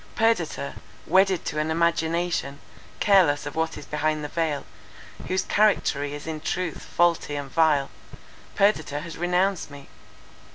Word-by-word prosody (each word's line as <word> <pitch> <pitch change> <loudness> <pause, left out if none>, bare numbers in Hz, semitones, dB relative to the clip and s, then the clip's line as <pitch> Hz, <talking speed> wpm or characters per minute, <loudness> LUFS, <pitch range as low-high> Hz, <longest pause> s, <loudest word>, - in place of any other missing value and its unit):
Perdita, 170 - 0 0.3
wedded 190 +1 +3
to 150 - -2
an 155 +1 -1
imagination, 165 -3 0 0.4
careless 180 -9 +4
of 145 - -5
what 160 0 -1
is - - -9
behind 155 0 -1
the 150 - -4
veil, 160 -4 -1 0.6
whose 185 +1 0
charactery 145 -9 +1
is 145 - -9
in 160 -1 -4
truth 180 0 -3
faulty 170 -4 +1
and 140 -2 -5
vile, 155 -4 +2 0.6
Perdita 160 -8 +1
has 165 +1 -8
renounced 180 +1 0
me. 140 -1 -12
160 Hz, 135 wpm, -25 LUFS, 145-180 Hz, 0.6 s, careless